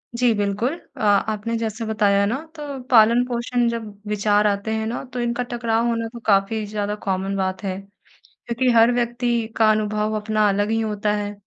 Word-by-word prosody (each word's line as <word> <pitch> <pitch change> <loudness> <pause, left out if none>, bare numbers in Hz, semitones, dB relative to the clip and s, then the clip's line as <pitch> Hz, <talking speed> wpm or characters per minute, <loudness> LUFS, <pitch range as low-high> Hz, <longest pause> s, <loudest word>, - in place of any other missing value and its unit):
जी, 245 -1 +3
बिल्कुल 205 +6 -1 0.2
अ - - -10 0.3
आपने 220 +2 -2
जैसे 225 0 -3
बताया 205 -2 +2
ना 220 +5 0 0.2
तो 290 -3 -6
पालन-पोषण 240 +1 +3
जब 230 -2 -4 0.2
विचार 210 0 +2
आते 200 +1 -1
हैं, 220 0 -1
ना 235 - -4
तो 250 - -3
इनका 240 +1 -1
टकराव 235 -1 0
होना 230 -1 -1
तो 235 - -8
काफ़ी 205 +1 +2
ज़्यादा 205 0 -3
कॉमन 195 0 -1
बात 190 0 -2
है। 190 -1 -3 0.7
क्योंकि 240 +2 +1
हर 230 +1 +6
व्यक्ति 240 -1 0
का 220 -1 +5
अनुभव 215 0 0
अपना 215 0 +1
अलग 205 +1 0
ही 225 0 +1
होता 210 -1 -1
है, 205 0 -3
220 Hz, 180 wpm, -22 LUFS, 205-235 Hz, 0.7 s, हर